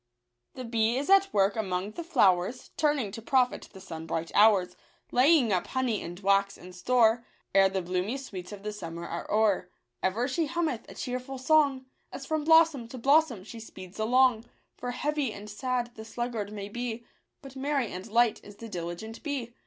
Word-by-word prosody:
The 255 - -6
bee 230 +1 +1
is 285 +7 -1
at 390 0 +5
work 200 0 +2
among 195 -2 -2
the 340 - -6
flowers. 235 - +2
Turning 290 -9 +1
to 225 - -7
profit 250 +2 +1
the 190 - -12
sunbright 165 -2 -5
hours. 200 -4 +4 0.4
Laying 255 -3 +4
up 180 - 0
honey 255 -5 -1
and 175 +1 -7
wax 200 0 +2
in 180 +1 -12
store, 230 +4 +3 0.3
Ere 195 -1 +6
the 190 -1 -2
bloomy 185 +8 -2
sweets 195 -9 -8
of 200 -1 -9
the 210 0 -4
summer 170 -4 -7
are 170 - -6
o'er. 210 -4 +2 0.3
Ever 220 +7 0
she 300 +4 -1
hummeth 320 -7 -2
a - - -11
cheerful 255 +2 -5
song, 275 -1 +3 0.3
As 270 - -7
from 310 +1 -1
blossom 320 -6 +5
to 255 - -9
blossom 275 -4 +3
she 225 +3 -10
speeds 190 -3 -11
along; 245 0 +3 0.3
For 245 - -5
heavy 290 0 -1
and 205 +1 -9
sad 240 +2 -2
the 220 - -9
sluggard 225 -2 -4
may 200 -1 -6
be, 235 +1 -5 0.4
But 270 -1 -11
merry 270 -3 -1
and 185 +3 -7
light 230 +1 +2
is 205 - -12
the 230 +2 -9
diligent 180 +5 -6
bee. 270 -6 -4
230 Hz, 185 wpm, -28 LUFS, 195-260 Hz, 0.4 s, Ere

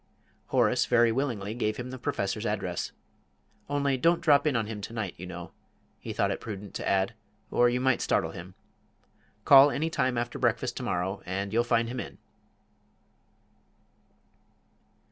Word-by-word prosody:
Horace 120 -1 +2
very 120 -1 +4
willingly 115 -5 -2
gave 110 -2 -1
him 125 +1 -6
the 130 - -7
Professor's 100 -2 -2
address. 95 -4 -2 0.8
"Only 140 -2 +1
don't 170 +6 +3
drop 145 -1 +4
in 145 - +1
on 115 -2 +1
him 105 -1 -6
to 115 - -7
night, 110 -6 -3
you 90 - -8
know," 90 -1 -8 0.5
he - - -6
thought - - 0
it - - -4
prudent 105 -2 -7
to - - -3
add, 95 +2 +1 0.4
"or 120 0 +4
you 125 +1 0
might 130 -1 +2
startle - - +1
him. 90 +2 -10 0.9
Call 140 +1 +9
any 160 +3 -1
time 130 -7 0
after 120 0 -3
breakfast - - 0
to - - -4
morrow, 90 +3 -2
and 100 +3 -4
you'll 120 +1 +3
find 115 -1 +1
him 125 +2 -4
in." - - -7
115 Hz, 165 wpm, -28 LUFS, 100-130 Hz, 0.9 s, Call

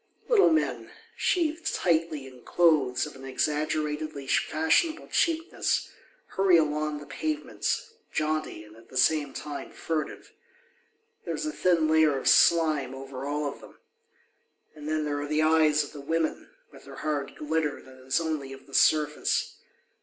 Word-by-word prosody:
Little 450 -5 +5
men, 315 -1 0 0.3
sheathed 330 -2 0
tightly 165 -4 0
in 130 -2 -13
clothes 155 -8 +2
of 150 - -10
an 135 - -12
exaggeratedly 150 +1 -2
fashionable 160 - +1
cheapness, 330 0 0 0.4
hurry 190 -2 +4
along 150 -1 0
the 145 - -9
pavements, 315 - -3 0.2
jaunty 155 -7 -2
and 105 0 -16
at 115 0 -18
the 130 - -7
same 150 +1 +3
time 145 +1 -7
furtive. 160 -2 -4 0.9
There - - -3
is - - -4
a 310 - -2
thin 175 - +2
layer 155 -2 +4
of 135 - -4
slime 155 -6 +4
over 135 0 -7
all 150 +1 -2
of 140 - -5
them. - - -15 1.0
And 150 -1 -8
then 155 -1 0
there 145 -1 -2
are 145 - -4
the 155 +1 +2
eyes 155 -1 +4
of 145 - -10
the 145 - -8
women, 160 +2 -2 0.2
with - - -15
their - - -11
hard 145 -3 -3
glitter 150 -1 -1
that 130 -1 -16
is 135 - +2
only 155 -5 -3
of 135 - -13
the 140 - -18
surface. 150 +1 +2
155 Hz, 155 wpm, -27 LUFS, 145-160 Hz, 1.0 s, Little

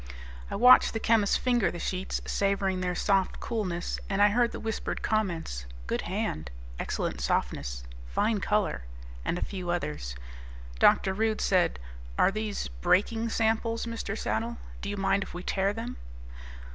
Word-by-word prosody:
I - - -3
watched 250 +5 +7
the 225 - -1
chemists 220 -3 +3
finger 245 -2 +2
the - - -6
sheets, 185 +2 -2
savoring 195 -2 0
their 180 -1 -1
soft 195 0 +1
coolness, 185 -7 -2
and 195 0 0
I 205 0 +7
heard 235 +3 +2
the - - -6
whispered 220 -1 -3
comments, 170 - -1 0.2
"good - - -1
hand," 75 -4 -3 0.3
"excellent - - -2
softness," - - -1 0.2
"fine 210 - +1
color," 205 - 0 0.4
and 175 - -1
a - - -1
few 185 -3 -5
others. 75 - -2 0.6
Dr. 190 - +5
Rude 220 +2 0
said, 180 - +2 0.4
"Are - - +5
these 215 - -3
'breaking 200 - +1
samples', 225 +1 +1
Mr. 230 -2 -4
Saddle? 235 +1 -2 0.2
Do 200 - -4
you 205 - -3
mind 195 +1 +2
if 190 - -6
we 180 - -5
tear 195 +1 +1
them?" 230 +4 -5
200 Hz, 155 wpm, -29 LUFS, 180-225 Hz, 0.6 s, watched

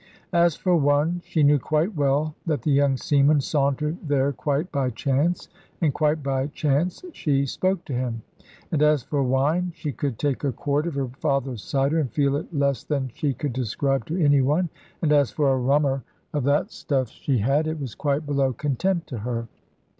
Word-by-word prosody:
As 170 -2 +4
for 180 -2 +1
one, 150 +3 +2
she 155 - +1
knew 145 0 +5
quite 155 - 0
well 145 +1 +1
that 150 -7 0
the 150 - +1
young 140 -1 +3
seaman 145 +2 +3
sauntered 145 +3 0
there 145 -3 +1
quite 145 +6 -1
by 135 -2 0
chance, 140 +8 0 0.3
and 155 -5 +2
quite 150 -1 +1
by 135 0 0
chance 155 - -1
she 140 - +1
spoke 185 +6 -1
to 140 - -5
him: 120 -3 -2 0.5
and 150 - +1
as 150 -3 +4
for 145 +2 -1
wine, 145 +7 +1
she 155 -3 -4
could 135 -3 -3
take 145 0 -1
a 140 - +1
quart 145 +5 -1
of 165 - -4
her 135 -2 -1
father's 135 - -1
cider, 140 +3 +1
and 135 -7 -1
feel 140 +1 +1
it 150 - -4
less 140 -3 0
than 135 -4 -2
she 140 -1 -1
could 140 +1 -3
describe 130 +3 -1
to 170 +3 -2
any 145 -4 +4
one; 155 +7 +1 0.3
and 155 - +2
as 145 -3 +4
for 140 -3 +1
a 130 - 0
rummer 135 +1 +2 0.3
of 145 -4 -1
that 145 +1 +2
stuff 130 -5 -1
she 135 +2 -1
had, 135 +8 +1
it 155 0 -3
was 130 -6 -5
quite 145 0 -1
below 140 -2 +1
contempt 165 - -1
to 125 - -5
her. 115 +1 -3
145 Hz, 195 wpm, -24 LUFS, 135-155 Hz, 0.5 s, knew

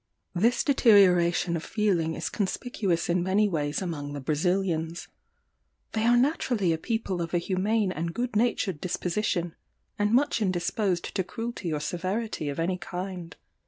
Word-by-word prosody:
"This 230 +7 +2
deterioration 180 - +4
of 165 - -3
feeling 180 -7 0
is - - -3
conspicuous 195 -3 -1
in 175 +1 +1
many 195 +4 +2
ways 150 -2 -1
among 145 -5 -4
the 145 - -4
Brazilians. 165 +3 -1 0.8
They 220 +1 0
are 240 0 +5
naturally 245 - +1
a 160 - -3
people 220 -4 -2
of 170 +1 -3
a - - +4
humane 195 +3 0
and 170 -1 -3
good 240 +5 -3
natured 205 -7 +1
disposition, 180 -1 -1 0.5
and 205 0 +2
much 255 0 +2
indisposed 185 0 -1
to 190 - 0
cruelty 225 -4 -5
or 150 - -1
severity 185 +2 -3
of 140 - -4
any 180 +2 0
kind. 180 -3 -6
185 Hz, 150 wpm, -27 LUFS, 170-215 Hz, 0.8 s, are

